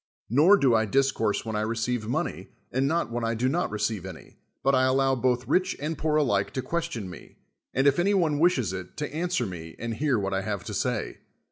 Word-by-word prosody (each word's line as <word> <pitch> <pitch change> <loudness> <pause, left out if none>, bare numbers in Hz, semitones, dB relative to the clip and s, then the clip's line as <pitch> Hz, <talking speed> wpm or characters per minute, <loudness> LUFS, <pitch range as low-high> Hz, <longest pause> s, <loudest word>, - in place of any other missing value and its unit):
Xor 165 - +6
do 130 -4 +4
I 110 0 +3
discourse 115 -3 +1
when 110 -1 -3
I 105 - 0
receive 115 +1 -1
money, 120 - -2 0.2
and 135 +2 +1
riot 165 -6 0
when 120 0 -2
I 115 0 0
do 120 +3 0
not 165 +7 0
receive 105 -2 -2
any, 95 -3 -11 0.2
but 135 - +3
I 130 -1 +4
allow 135 +1 +3
both 125 0 0
rich 185 0 +1
and 155 +3 -2
poor 155 +1 0
alike 125 -10 +2
to 130 - -2
ques - - -16 0.2
SOCRATES 170 - -9
tion 100 -7 -5
me, - - -12 0.4
and, 135 - +1
if 140 +3 +4
any 200 +3 +3
one 155 -6 +2
wishes 135 - +2
it, 90 -1 -7
to 150 - -3
answei 170 -6 -1
me 80 -3 -8
and 115 0 -4
hear 135 +2 +1
what 100 -1 -2
I 95 - 0
have 100 -2 -3
to - - -6
say. - - -2
125 Hz, 235 wpm, -27 LUFS, 110-145 Hz, 0.4 s, Xor